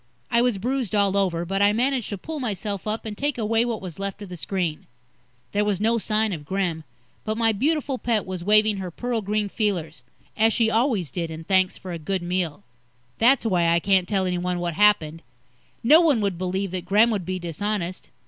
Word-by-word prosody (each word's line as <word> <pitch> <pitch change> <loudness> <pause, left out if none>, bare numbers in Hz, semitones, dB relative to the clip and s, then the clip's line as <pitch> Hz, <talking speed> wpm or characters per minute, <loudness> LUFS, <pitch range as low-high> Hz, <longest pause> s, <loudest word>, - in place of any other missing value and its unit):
I 235 - +4
was 245 -4 +1
bruised 245 0 -2
all 200 -1 +2
over, 175 -4 0
but 195 +3 -1
I 205 +1 +5
managed 250 +1 0
to 205 - -4
pull 310 - -6
myself 205 -4 -3
up 215 +2 -2
and 215 -1 -5
take 290 +4 -1
away 225 0 +1
what 230 -4 -3
was 180 -1 -8
left 200 +1 -3
of 200 - -10
the 180 - -7
screen. 175 -2 -3 0.6
There 205 - +1
was 205 -3 0
no 230 +2 +2
sign 215 -1 +1
of 155 -4 -6
Gremm, 175 -1 -2 0.4
but 215 0 -2
my 225 -1 +3
beautiful 275 +3 -1
pet 230 -3 0
was 185 -2 -5
waving 215 +1 +4
her 190 -2 -4
pearl 240 +6 -3
green 210 +1 -1
feelers 175 - -2 0.3
as 225 +1 +3
she 225 -1 +2
always 220 - +1
did 170 +1 -3
in 160 0 -7
thanks 185 +1 +2
for 185 - -8
a 170 - -5
good 185 +3 -2
meal. 175 - -2 0.6
That's 250 +2 +4
why 180 -6 +2
I 170 0 +3
can't 190 0 +2
tell 195 -2 +1
anyone 180 0 -1
what 175 -1 -2
happened. 165 -4 +3 0.6
No 305 +8 +7
one 300 -8 +3
would 200 -3 0
believe 190 +1 -2
that 185 -1 -4
Gremm 215 +4 +4
would 205 -4 -1
be 185 +2 -3
dishonest. 185 +2 -3
200 Hz, 210 wpm, -24 LUFS, 180-225 Hz, 0.6 s, No